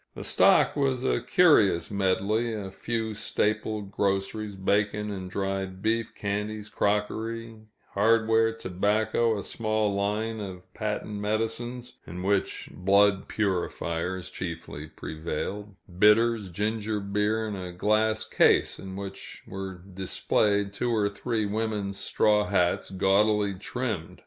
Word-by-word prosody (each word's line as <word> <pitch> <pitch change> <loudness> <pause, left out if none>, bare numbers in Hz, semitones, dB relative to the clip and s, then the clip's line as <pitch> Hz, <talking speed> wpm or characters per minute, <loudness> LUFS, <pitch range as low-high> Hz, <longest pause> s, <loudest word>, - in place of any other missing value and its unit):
The - - -6
stock - - +4
was 135 -3 0
a - - +1
curious 110 - +4
medley 100 +4 +1
a 100 -3 -5
few 110 +2 -3
staple 110 0 -1
groceries, 100 +1 -2
bacon 105 +2 0
and 95 -2 -5
dried 95 -1 -3
beef, 115 +1 0
candies, 105 +1 -3
crockery, 110 +3 -1 0.3
hardware, 115 +1 +3
tobacco, 110 +2 0
a 100 - -4
small 110 -1 0
line 105 +3 -1
of 95 -3 -7
patent 105 -1 -3
medicines, 115 +4 -3
in 90 +2 -6
which 100 0 0
blood 100 +1 +3
purifiers 90 -2 -2
chiefly 80 -4 -6
prevailed, 85 +7 -5 0.2
bitters, 105 0 +4
ginger 105 +3 -1
beer, 105 +2 0
and 105 - -4
a 90 -2 -6
glass 110 +4 +1
case - - +3
in 95 0 -7
which 100 0 -8
were 95 -2 -7
displayed 100 +2 +1
two 120 +4 -1
or 105 -3 +2
three 110 +2 -2
women's 105 -2 -2
straw 105 -1 +2
hats, 90 -4 +1
gaudily 100 +2 +2
trimmed. 105 -2 -4
105 Hz, 120 wpm, -27 LUFS, 95-110 Hz, 0.3 s, stock